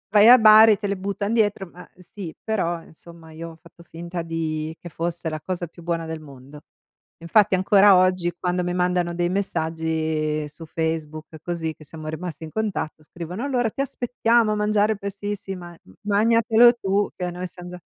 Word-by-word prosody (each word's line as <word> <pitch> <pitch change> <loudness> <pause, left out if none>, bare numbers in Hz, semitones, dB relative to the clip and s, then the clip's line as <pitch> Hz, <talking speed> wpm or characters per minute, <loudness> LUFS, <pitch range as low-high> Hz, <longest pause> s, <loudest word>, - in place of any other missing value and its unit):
vai 210 +2 +8
a 250 - +10
Bari, 220 -1 +8
te 205 -1 -4
le 200 - -1
buttano 200 +2 -3
dietro 205 -4 +1
ma, 180 +1 -13
sì, 180 -2 -9
però 175 -6 -2
insomma 165 0 -15
io 165 +1 -7
ho 165 - -13
fatto 170 0 -17
finta 170 +1 -6
di 160 -1 -3
che 175 - -10
fosse 170 +1 -4
la 155 -1 -4
cosa 180 -2 -4
più 170 +1 -16
buona 165 -1 -2
del 160 -1 -6
mondo. 140 0 -13 0.6
Infatti 195 +4 +3
ancora 195 +1 +5
oggi 185 -1 +2
quando 180 0 -1
mi 175 0 -2
mandano 180 -1 0
dei 175 0 0
messaggi 160 -4 -2
su 160 +2 -11
Facebook 160 -1 -3 0.2
così 165 -2 -3
che 155 - -16
siamo 155 +1 -10
rimasti 165 +1 -6
in 155 - -10
contatto 205 -8 -3
scrivono: 175 - -7
"Allora 250 -5 0
ti 275 - -3
aspettiamo 235 -4 +1
a - - -1
mangiare 210 0 +2
il 205 - -11
Percebes" 205 0 -5
"Sì, 195 -1 -6 0.4
magnatelo 230 +3 +4
tu 200 -2 0
che 180 - -4
a 175 - -3
noi 180 +1 -5
siamo 180 0 -11
già" 180 - -9
180 Hz, 185 wpm, -23 LUFS, 160-205 Hz, 0.6 s, a